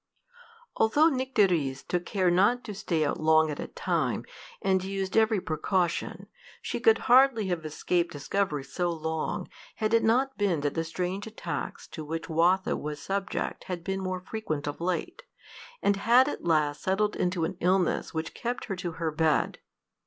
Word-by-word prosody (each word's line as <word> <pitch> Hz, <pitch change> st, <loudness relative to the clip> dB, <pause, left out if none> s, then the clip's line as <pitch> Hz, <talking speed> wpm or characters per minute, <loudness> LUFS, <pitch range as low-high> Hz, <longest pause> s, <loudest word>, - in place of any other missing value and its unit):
Although 290 Hz, +9 st, +4 dB
Nycteris 195 Hz, -, +1 dB
took 175 Hz, -1 st, -2 dB
care 185 Hz, -3 st, +2 dB
not 205 Hz, +8 st, +3 dB
to 210 Hz, -, -6 dB
stay 170 Hz, -6 st, -1 dB
out 145 Hz, -, -1 dB
long 160 Hz, 0 st, +4 dB
at 145 Hz, -, -6 dB
a -, -, -4 dB
time, -, -, -1 dB, 0.3 s
and 190 Hz, -1 st, +1 dB
used 195 Hz, 0 st, -3 dB
every 220 Hz, -2 st, +4 dB
precaution, 175 Hz, +2 st, -1 dB, 0.3 s
she -, -, -4 dB
could 450 Hz, -1 st, +5 dB
hardly 245 Hz, -5 st, +5 dB
have 175 Hz, -3 st, -2 dB
escaped 170 Hz, +3 st, -1 dB
discovery 150 Hz, 0 st, -1 dB
so 175 Hz, +6 st, -2 dB
long, 160 Hz, -1 st, -3 dB, 0.3 s
had 215 Hz, 0 st, -1 dB
it 230 Hz, -, +4 dB
not 255 Hz, +4 st, +2 dB
been 185 Hz, -7 st, +1 dB
that 145 Hz, -1 st, -1 dB
the 165 Hz, -, -1 dB
strange 180 Hz, +5 st, -3 dB
attacks 220 Hz, -, -5 dB
to 155 Hz, -, -7 dB
which 165 Hz, +2 st, -5 dB
Watho 175 Hz, +4 st, +2 dB
was 150 Hz, 0 st, -5 dB
subject 195 Hz, +3 st, -3 dB
had 180 Hz, -3 st, -5 dB
been 190 Hz, +1 st, -2 dB
more 185 Hz, -1 st, -3 dB
frequent 185 Hz, -7 st, -4 dB
of 145 Hz, +2 st, -5 dB
late, 185 Hz, -, -2 dB, 0.6 s
and 200 Hz, -1 st, +3 dB
had 240 Hz, +6 st, +5 dB
at -, -, -4 dB
last 150 Hz, -3 st, +1 dB
settled 205 Hz, +2 st, +1 dB
into 180 Hz, -2 st, 0 dB
an 190 Hz, -, -4 dB
illness 180 Hz, 0 st, +1 dB
which 160 Hz, 0 st, -4 dB
kept 245 Hz, +1 st, -4 dB
her 195 Hz, -, -3 dB
to 175 Hz, -2 st, -4 dB
her 165 Hz, -1 st, -2 dB
bed. 155 Hz, 0 st, +1 dB
185 Hz, 170 wpm, -28 LUFS, 160-210 Hz, 0.6 s, could